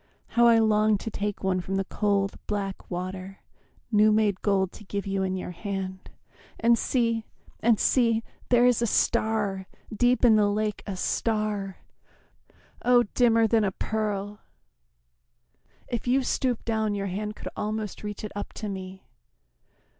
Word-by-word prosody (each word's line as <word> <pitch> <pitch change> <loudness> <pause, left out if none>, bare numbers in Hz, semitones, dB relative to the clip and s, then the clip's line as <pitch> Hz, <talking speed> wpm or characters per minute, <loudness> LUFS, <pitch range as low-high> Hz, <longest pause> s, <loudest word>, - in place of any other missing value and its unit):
How 235 0 +4
I 230 -1 +6
long 215 -1 +3
to 225 - -6
take 205 -1 -3
One 185 -1 +1
from 190 +2 -4
the 195 0 0
cold 200 -1 0
black 200 -2 -4
water 185 +2 -5 0.5
new 215 0 +5
made 210 -3 +2
gold 195 -3 +1
To - - -13
give 200 0 -4
you 195 -1 -1
in 190 0 -1
your 185 -1 -5
hand! 190 0 -5 0.5
And 235 +1 +5
see, 230 -2 0 0.3
and 230 -1 +3
see, 230 -3 +3 0.3
There 245 0 +5
is 245 -2 +3
a 235 - +2
star, 205 -3 +1 0.3
deep 245 +3 +3
in 220 -2 +6
the 205 -1 +3
lake, 210 0 -1
a 195 - -3
star! 210 -2 -1 1.1
Oh, 245 0 +5
dimmer 230 -2 +4
than 220 0 +3
a 195 - +1
pearl 210 0 -3 1.5
if 240 0 -4
you 260 +2 +3
stoop 250 -2 -1
down 220 -2 0
Your 200 -1 -2
hand 210 +3 -4
could - - -7
almost 215 -1 -3
reach 210 0 -6
it 215 - -5
up 205 - -5
to 210 - -5
me. 190 -1 -7
210 Hz, 155 wpm, -26 LUFS, 195-225 Hz, 1.5 s, I